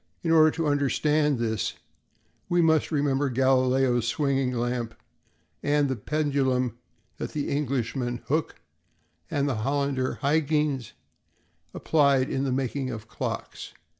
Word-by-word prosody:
In 165 - +1
order 155 -1 +7
to 165 +1 -2
understand 150 +1 +2
this, 110 -2 -2 0.7
we 175 - +2
must 160 -2 +3
remember 140 -2 +1
Galileo's 130 -1 +2
swinging 135 0 0
lamp 120 -1 -2 0.7
and 145 -1 +2
the 130 - 0
pendulum 130 -1 0 0.4
that - - -5
the 145 -2 -2
Englishman, 125 -3 -2
Hooke, 155 +3 -1 0.7
and 140 0 0
the 130 -5 -1
Hollander, 135 +2 -1
Huyghens, 150 -3 +1 0.8
applied 140 -4 +2
in 135 +1 -1
the 135 - -1
making 130 +1 -2
of 110 -3 -7
clocks. - - -5
135 Hz, 120 wpm, -26 LUFS, 125-145 Hz, 0.8 s, order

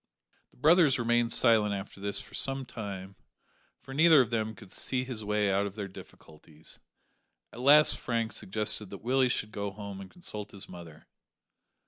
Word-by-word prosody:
The - - -28
brothers 155 +1 +5
remained 120 0 +1
silent 110 -4 +4
after 100 0 -8
this 100 0 -2
for - - -12
some 135 0 -1
time, 100 -5 -7 0.6
for 135 - -11
neither 160 +1 +6
of 125 -3 +2
them 110 -1 -1
could 95 - -14
see 130 -1 -1
his 125 -4 -6
way 105 -1 +1
out 100 +1 +1
of 100 - -9
their 105 -2 -4
difficulties; 80 -4 -13 0.7
at - - -10
last 145 +4 +6
Frank 115 -2 -2
suggested 105 0 -2
that 100 - -10
Willie 130 +1 +2
should 105 -2 -1
go 100 -1 -3
home 100 -1 -8
and 95 - -10
consult 105 - -6
his 100 0 -10
mother. 85 -4 -12
110 Hz, 170 wpm, -29 LUFS, 100-125 Hz, 0.7 s, neither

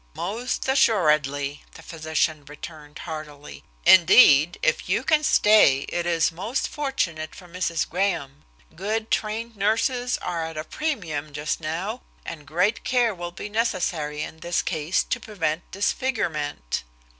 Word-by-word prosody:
"Most 225 +10 -3
assuredly," 150 - +2
the - - -13
physician 155 -2 -1
returned 150 0 -10
heartily. 150 - -8 0.2
"Indeed, 175 - +7
if - - +1
you - - +1
can 310 -1 +3
stay 210 - +5
it 175 0 -2
is 165 -1 +2
most 195 +10 -2
fortunate 175 - -3
for 180 - -13
Mrs. 170 -2 -2
Graham. 165 -7 -2 0.3
Good 215 +5 -3
trained 225 +2 -2
nurses 235 +5 +1
are 170 -2 -3
at 160 -1 -6
a 155 - -3
premium 160 - -3
just 150 +1 -2
now, 175 +9 -4 0.2
and 150 -3 -8
great 180 +8 +1
care 245 -3 +2
will 175 -1 -6
be 190 - -7
necessary 175 -9 -1
in 160 - -9
this 170 +2 -1
case 160 0 0
to - - -2
prevent 165 -6 -3
disfigurement!" 165 - -2
170 Hz, 135 wpm, -24 LUFS, 155-215 Hz, 0.3 s, Indeed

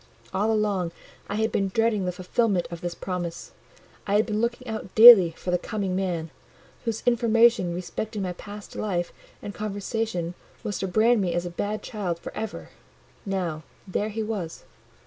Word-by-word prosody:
All 205 +4 +1
along 205 -5 0 0.4
I 205 - -2
had 220 +1 +1
been 195 - +1
dreading 215 0 +1
the 180 - 0
fulfilment 185 +1 0
of 170 -1 -7
this 175 -1 -4
promise,—I 180 +2 -6
had 215 - +4
been 215 -1 -1
looking 235 +2 -2
out 220 -4 -6
daily 220 -6 +11
for 180 - -3
the 180 - +2
"Coming 195 -2 -3
Man," 175 -4 -2 0.5
whose 225 -2 -2
information 230 -6 +4
respecting 205 +3 -4
my 180 -1 -2
past 205 +3 -10
life 175 -4 -2 0.3
and 205 - -5
conversation 205 -3 -3 0.3
was 205 - -3
to 190 - -1
brand 220 +4 +3
me 180 -3 0
as 175 0 -1
a 175 - -4
bad 205 +5 -3
child 190 -6 -3
for - - -9
ever: 220 -1 -5 0.6
now 180 -5 -2 0.3
there 205 +3 -1
he 220 +1 -3
was. 200 -7 -4
200 Hz, 165 wpm, -26 LUFS, 180-220 Hz, 0.6 s, daily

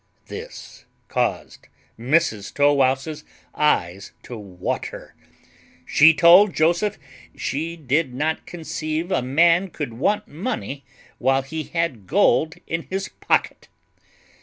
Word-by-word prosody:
This - - -10 0.2
caused - - -2 0.3
Mrs 120 -6 +1
Tow 145 0 +4
wouse's 135 +3 0 0.3
eyes 100 - 0
to 125 - -8
water; 95 -5 -6 0.7
she 155 +2 +6
told 175 +5 +6
Joseph 175 +6 +1 0.4
she 160 +4 -3
did 145 -1 0
not 150 +5 -2
conceive 160 0 -4
a 185 - +1
man 170 +8 +3
could 150 -7 -5
want 205 - 0
money 155 - -5 0.4
whilst 135 +2 +1
he 160 -1 -3
had 165 - -3
gold 160 -3 +3
in 165 0 -4
his 190 +1 -3
pocket. - - -1
155 Hz, 110 wpm, -22 LUFS, 135-170 Hz, 0.7 s, she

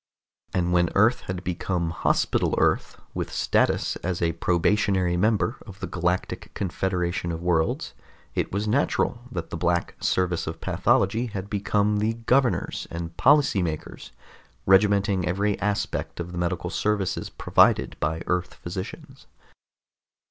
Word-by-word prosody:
And 90 -2 0
when 85 -1 +3
Earth 110 +5 +4
had 90 -1 -3
become 90 -2 -2
Hospital - - +1
Earth, - - +1
with - - -4
status - - +1
as 90 -1 -3
a 85 -1 +1
probationary 90 +1 +1
member 110 +5 +1
of 95 -2 -11
the - - -3
Galactic 90 +1 -2
Confederation 90 -1 -1
of 85 +1 -5
Worlds, 80 -2 0 0.4
it - - -1
was 100 +2 -2
natural 120 0 +1
that 85 -3 -5
the - - -3
Black 85 -1 0
Service 90 -2 0
of - - -5
Pathology 110 +6 +1
had 100 -2 -6
become 105 0 +1
the 110 +2 +1
governors 120 +2 +1
and 85 0 -6
policy 140 - +4
makers, 80 -3 -5 0.5
regimenting 100 -1 +3
every 100 +3 0
aspect 105 -3 -2
of 85 0 -4
the 90 - -7
medical 85 -1 -2
services 105 -3 -1
provided - - +3
by 80 +2 -1
Earth 90 0 -1
physicians. 95 +2 -8
95 Hz, 135 wpm, -25 LUFS, 85-105 Hz, 0.5 s, Earth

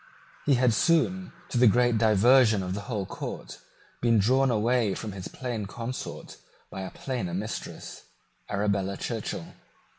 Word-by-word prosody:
He 140 - +5
had 125 -2 +3
soon, 170 +7 +2 0.2
to 120 - 0
the 125 - +7
great 120 +1 +3
diversion 110 0 +5
of 90 0 -3
the 100 - -4
whole 105 -5 -2
court, - - -7 0.4
been 115 -1 +4
drawn 130 +6 +3
away 115 -2 +2
from 110 - -5
his 95 -1 -7
plain 120 -6 -4
consort 120 +5 -6 0.3
by 95 - -6
a 95 - -5
plainer 120 -10 -4
mistress, 105 +4 -6 0.4
Arabella 100 -1 0
Churchill. - - -4
115 Hz, 145 wpm, -27 LUFS, 100-125 Hz, 0.4 s, the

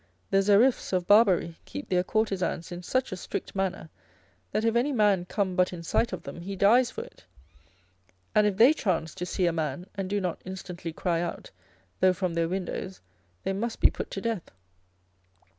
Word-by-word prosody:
The 195 - +5
Xeriffes 210 +4 +3
of 180 -1 +1
Barbary 190 -5 +4
keep 95 - -7
their 180 -1 +2
courtesans 190 -5 -1
in 175 0 -6
such 255 +8 -1
a - - -2
strict 185 - -5
manner, 190 -4 -2 0.6
that 220 - 0
if 230 0 +2
any 250 +5 +2
man 205 -7 +3
come 190 -1 -1
but 180 -1 +3
in 175 -2 -7
sight 230 +8 +1
of - - -5
them 170 - -8
he 195 +3 -5
dies 235 +6 +5
for - - -6
it; - - -17 1.1
and 210 0 +5
if 195 -2 -1
they 245 +7 +7
chance 165 - -1
to 180 -1 -5
see 180 - 0
a 170 - +2
man, 160 +1 -2
and 195 -2 -4
do 205 +1 0
not 180 -4 -3
instantly 180 -2 -6
cry 170 +1 -1
out, 175 - -5 0.5
though 185 -1 +5
from 185 -2 -2
their 165 0 0
windows, 190 +1 -4 0.4
they 195 - -1
must 225 +4 -3
be - - +5
put - - -5
to 195 - -5
death. 225 -6 -3
190 Hz, 195 wpm, -27 LUFS, 175-210 Hz, 1.1 s, they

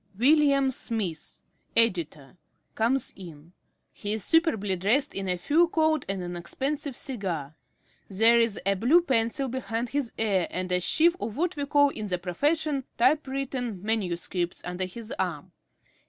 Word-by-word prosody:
_ - - -18
William 275 0 +4
Smith, 210 -10 -5 0.4
Editor, 170 -11 0 0.4
_comes 240 +5 +1
in. 170 -3 -12 0.4
He 205 0 -3
is 215 -3 -3
superbly 225 - +2
dressed 230 +11 +1
in 195 -1 -3
a 180 - 0
fur 310 - +3
coat 315 -3 +1
and 195 -2 -2
an 175 0 -5
expensive 270 - -3
cigar. 180 - -4 0.6
There 225 +4 +5
is 230 -3 +1
a 200 - +3
blue 245 - +4
pencil 260 -1 0
behind 240 -2 -3
his 280 -3 -2
ear, 200 -5 +1
and 185 0 -4
a 180 - +3
sheaf 330 - +3
of 220 +2 -4
what 355 +3 0
we 285 -1 -3
call 285 0 +4
in 215 -6 -5
the 180 -2 -1
profession 285 - 0
"typewritten 265 -5 0
manuscripts" 180 -4 -2
under 180 +1 -3
his 220 +5 -9
arm. 175 -6 -3
225 Hz, 155 wpm, -27 LUFS, 185-275 Hz, 0.6 s, There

